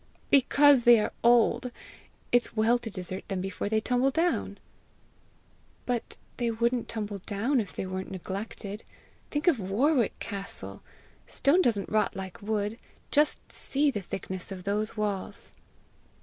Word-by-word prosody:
"Because 280 0 +6
they 235 -1 +7
are 210 - -1
old. 240 +1 +4 0.6
It's 245 -1 +2
well 230 +2 +3
to 240 - -6
desert 185 -1 -5
them 195 -2 -2
before 195 +2 -3
they 220 0 +2
tumble 250 +4 +2
down." 330 +5 0 1.3
"But 245 -2 -2 0.2
they 240 -1 0
wouldn't 235 +2 0
tumble 210 -2 -4
down 225 +8 0
if 205 -4 -3
they - - -3
weren't 185 0 -4
neglected. 200 +2 -6 0.5
Think 295 +4 -2
of 315 -9 +5
Warwick 235 +7 +1
castle! 200 -2 -5 0.5
Stone 315 +7 +3
doesn't 215 - +1
rot 215 -1 +1
like 190 -1 -7
wood! 210 +2 -2 0.3
Just 295 +1 +2
see 285 +1 +1
the 205 - -3
thickness 190 0 -5
of 185 -2 -6
those 210 +3 -2
walls!" 205 -3 -3
220 Hz, 140 wpm, -28 LUFS, 200-250 Hz, 1.3 s, they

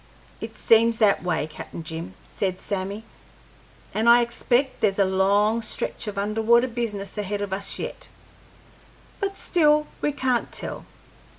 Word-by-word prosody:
"It - - -7
seems 230 0 +4
that 210 -3 +3
way, 165 -5 -1
Cap'n 155 +1 -9
Jim," 160 - -7
said 185 -2 -2
Sammy, 200 +2 -4 0.9
"and 225 +2 +2
I 240 +1 +8
expect 240 +2 0
there's 200 -3 +2
a 200 - +4
long 200 +4 +2
stretch 220 - -3
of 210 -1 -5
underwater 220 +4 +3
business 215 -5 -4
ahead 205 0 -2
of 195 -2 -4
us 195 +1 -1
yet, - - -6 1.1
but 395 0 -2
still 300 -3 +3 0.2
we 295 - +1
can't 260 -4 -1
tell. - - -4
210 Hz, 140 wpm, -24 LUFS, 195-235 Hz, 1.1 s, I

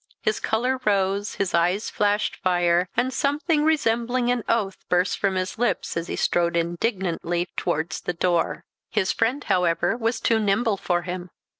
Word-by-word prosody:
His 215 - 0
colour 255 +4 0
rose, 200 -1 +1
his 195 -2 -1
eyes 180 +5 +1
flashed 205 0 +1
fire, 175 -1 +2
and 260 +1 +1
something 295 +3 +1
resembling 245 -5 +1
an 245 -2 -1
oath 210 -4 0
burst 180 +1 +1
from 195 -2 +1
his 185 +3 -3
lips 245 - 0
as 170 +1 -2
he - - -3
strode 170 0 +1
indignantly 175 -1 -1
towards 160 +3 -2
the 180 - -2
door. 175 0 0 0.2
His 200 -3 +1
friend, 250 +6 0
however, 175 +3 +1
was 230 0 -1
too 225 -1 +2
nimble 210 +1 +1
for 175 -2 -1
him. 180 0 -5
195 Hz, 160 wpm, -24 LUFS, 175-230 Hz, 0.2 s, fire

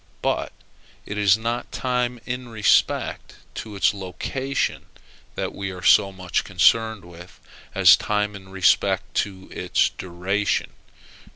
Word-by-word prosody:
But - - -1 0.5
it 100 - -6
is 105 0 +4
not 115 +2 -3
time 125 -1 -1
in 125 0 -5
respect 110 -2 +1 0.2
to 110 -2 -7
its 100 - +2
location 130 +8 -3 0.5
that - - -3
we 100 -1 -4
are 90 -1 -8
so 100 +2 +5
much 95 -2 -2
concerned 110 -4 +2
with, 85 +1 -14 0.4
as - - +8
time 105 0 -1
in 95 -1 -12
respect 95 -1 +1
to 95 -2 -2
its - - +1
duration. 95 +3 -2
100 Hz, 125 wpm, -23 LUFS, 95-115 Hz, 0.5 s, as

